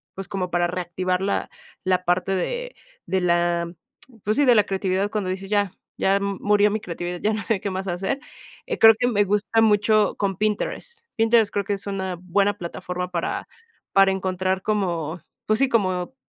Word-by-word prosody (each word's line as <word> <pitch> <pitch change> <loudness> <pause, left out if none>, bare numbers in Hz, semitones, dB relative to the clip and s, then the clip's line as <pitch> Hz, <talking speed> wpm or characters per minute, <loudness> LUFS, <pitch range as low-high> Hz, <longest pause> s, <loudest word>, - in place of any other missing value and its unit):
pues, 195 0 -6
como 185 -2 -3
para 175 0 +2
reactivar 180 +1 -2
la 200 +1 -1 0.3
la 185 -1 +1
parte 180 +2 +1
de - - -3 0.3
de 190 -1 0
la, 170 -1 +1 0.5
pues 215 +5 0
sí, 290 - +4
de 245 -2 +6
la 210 - +6
creatividad, 195 +1 -1
cuando 205 -4 -2
dices: 195 +1 -5
"Ya, 205 -3 +1 0.3
ya 195 +1 +3
m 200 -1 -2
murió 210 0 +4
mi 215 - -1
creatividad, 175 -2 -5
ya 215 +1 +1
no 220 - -2
sé 220 -4 +1
qué 200 - -3
más 190 +1 -4
hacer". 195 +10 -2 0.5
Eh, - - -2
creo 225 0 +9
que 245 - +2
me 205 -4 +3
gusta 210 +3 +1
mucho 215 0 +3
con 195 -3 -1
Pinterest. 215 - -2 0.2
Pinterest 225 -2 +3
creo 200 -2 -1
que 205 - -1
es 200 +1 -5
una 190 -2 -3
buena 200 +3 +1
plataforma 180 +1 -5
para 170 -1 -2 0.5
para 195 0 +6
encontrar 185 0 -1
como 175 -6 -1 0.3
pues 215 0 +3
sí, 270 -1 +3
como 185 -1 0
195 Hz, 190 wpm, -23 LUFS, 180-210 Hz, 0.5 s, creo